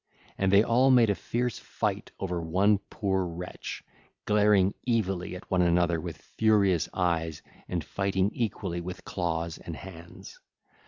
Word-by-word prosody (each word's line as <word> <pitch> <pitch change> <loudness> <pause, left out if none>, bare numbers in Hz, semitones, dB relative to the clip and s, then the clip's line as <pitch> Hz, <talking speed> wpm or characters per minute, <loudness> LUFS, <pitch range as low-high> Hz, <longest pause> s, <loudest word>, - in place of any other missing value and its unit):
And 95 -1 +1
they 100 +2 +7
all 125 +4 +4
made 120 -5 +6
a - - +3
fierce 120 +4 -2
fight - - -3
over 90 -3 -2
one 95 +5 +3
poor 95 -3 0
wretch, 90 +1 -6 0.4
glaring 105 -2 +4
evilly 95 -6 0
at 90 - -11
one 90 -1 +3
another 85 -1 +2
with 85 -2 -6
furious 100 -7 +2
eyes 80 -3 -1 0.3
and 85 -3 -2
fighting 95 +3 0
equally 100 -6 -2
with 90 +1 -7
claws 85 -2 -2
and 85 - -7
hands. 85 -2 -11
95 Hz, 145 wpm, -28 LUFS, 85-105 Hz, 0.4 s, they